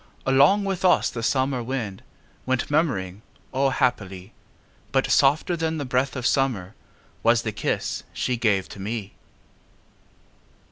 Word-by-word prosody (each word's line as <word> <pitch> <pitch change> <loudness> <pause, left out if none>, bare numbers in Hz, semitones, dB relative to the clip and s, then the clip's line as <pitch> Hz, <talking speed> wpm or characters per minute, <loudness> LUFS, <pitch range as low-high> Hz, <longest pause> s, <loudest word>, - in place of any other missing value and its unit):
Along 140 +10 +4
with 195 -1 -2
us 185 - +4
the 115 - -5
summer 130 +1 +1
wind 115 -6 -4 0.5
Went 130 +2 0
murmuring 105 - 0 0.3
O, 135 +1 +2
happily! 100 -8 -1 0.6
But 135 -1 +1
softer 150 +6 +3
than 160 -1 -1
the 145 - -3
breath 130 +2 0
of 125 -2 -4
summer 120 -10 0 0.5
Was 115 0 +3
the 110 - -2
kiss 105 - -2
she 125 - -1
gave 105 -5 +1
to - - -10
me. 105 0 -4
130 Hz, 135 wpm, -24 LUFS, 110-140 Hz, 0.6 s, Along